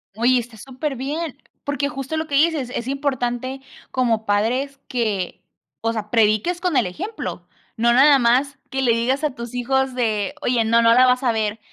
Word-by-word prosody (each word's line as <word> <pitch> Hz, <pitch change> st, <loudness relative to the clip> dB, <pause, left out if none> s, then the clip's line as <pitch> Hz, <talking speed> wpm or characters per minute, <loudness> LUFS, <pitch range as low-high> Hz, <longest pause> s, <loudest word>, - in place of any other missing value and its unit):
Oye, 245 Hz, +3 st, +3 dB
está 235 Hz, -1 st, -9 dB
superbién. 275 Hz, +4 st, -4 dB, 0.3 s
Porque 285 Hz, 0 st, -1 dB
justo 275 Hz, +1 st, -5 dB
lo 315 Hz, 0 st, -2 dB
que 285 Hz, -, -2 dB
dices, 300 Hz, -3 st, +2 dB
es 235 Hz, -, -4 dB
importante 260 Hz, -2 st, -2 dB, 0.3 s
como 230 Hz, -4 st, 0 dB
padres 250 Hz, +7 st, 0 dB
que, 215 Hz, -7 st, -2 dB, 0.4 s
o 225 Hz, +1 st, 0 dB
sea, 215 Hz, -2 st, -5 dB
prediques 225 Hz, -, +2 dB
con 360 Hz, -6 st, +1 dB
el -, -, +3 dB
ejemplo. 385 Hz, -, -6 dB, 0.3 s
No, 235 Hz, +1 st, +3 dB
nada 280 Hz, +3 st, +7 dB
más 255 Hz, +4 st, +2 dB
que 270 Hz, -, -1 dB
le 250 Hz, -3 st, +3 dB
digas 255 Hz, +5 st, 0 dB
a 295 Hz, -4 st, -1 dB
tus 235 Hz, -1 st, -7 dB
hijos 265 Hz, +2 st, 0 dB
de 225 Hz, 0 st, -1 dB
"Oye, 245 Hz, -4 st, +1 dB
no, 230 Hz, +1 st, +4 dB
no 230 Hz, 0 st, +5 dB
la 255 Hz, +2 st, +6 dB
vas 250 Hz, +1 st, +2 dB
a 245 Hz, -, +3 dB
ver". 220 Hz, -1 st, -1 dB
250 Hz, 185 wpm, -21 LUFS, 230-275 Hz, 0.4 s, nada